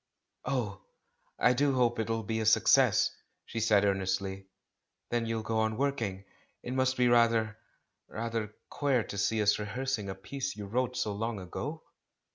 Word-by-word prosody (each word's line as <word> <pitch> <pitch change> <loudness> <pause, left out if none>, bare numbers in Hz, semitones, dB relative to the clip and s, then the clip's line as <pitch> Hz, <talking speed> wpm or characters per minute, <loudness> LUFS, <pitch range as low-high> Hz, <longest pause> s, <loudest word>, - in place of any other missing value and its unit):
"Oh, 115 -7 -2 0.6
I 125 - +4
do 140 +1 +2
hope 120 -2 +2
it'll 115 0 -1
be 110 +2 -2
a 110 - -1
success!" 110 - +5 0.3
she 115 - -4
said 105 -2 +4
earnestly, 95 0 -1 0.6
"then 120 -1 0
you'll 115 -1 -2
go 110 0 -1
on 110 0 0
working. 115 -9 -1 0.4
It 125 - -4
must 130 0 +1
be 125 -1 +4
rather 115 -2 +3 0.2
— - - -49 0.2
rather 115 -2 -4 0.2
queer 135 -5 +1
to 100 - -7
see 110 +2 +1
us 105 +1 +3
rehearsing 110 0 -2
a 95 - -4
piece 135 +8 -5
you 105 - -6
wrote 125 +4 -1
so 105 - 0
long 115 +1 -3
ago?" 140 - -6
115 Hz, 165 wpm, -30 LUFS, 105-125 Hz, 0.6 s, success